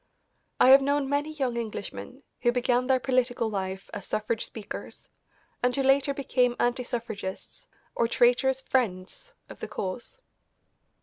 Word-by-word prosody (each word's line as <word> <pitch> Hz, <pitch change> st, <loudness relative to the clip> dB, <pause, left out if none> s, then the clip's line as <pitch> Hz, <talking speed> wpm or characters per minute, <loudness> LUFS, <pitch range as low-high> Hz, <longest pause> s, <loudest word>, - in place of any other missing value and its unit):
I -, -, +7 dB
have 270 Hz, +1 st, +9 dB
known 285 Hz, 0 st, +1 dB
many 285 Hz, +2 st, 0 dB
young 265 Hz, -6 st, -2 dB
Englishmen 235 Hz, +4 st, -6 dB, 0.2 s
who 240 Hz, -, +4 dB
began 245 Hz, 0 st, +1 dB
their 260 Hz, -1 st, +4 dB
political 250 Hz, -3 st, 0 dB
life 190 Hz, -1 st, -4 dB
as 205 Hz, -, -6 dB
suffrage 215 Hz, +1 st, -1 dB
speakers 215 Hz, -3 st, -8 dB, 0.5 s
and 250 Hz, 0 st, +2 dB
who 275 Hz, -, +1 dB
later 270 Hz, +1 st, +4 dB
became 250 Hz, -3 st, +1 dB
anti 245 Hz, +1 st, +1 dB
suffragists 230 Hz, -, -6 dB, 0.3 s
or 235 Hz, -, +1 dB
traitorous 250 Hz, +3 st, +3 dB
"friends" 250 Hz, -, -2 dB
of -, -, -12 dB
the -, -, -5 dB
cause. 200 Hz, -, -5 dB
250 Hz, 140 wpm, -27 LUFS, 230-270 Hz, 0.5 s, have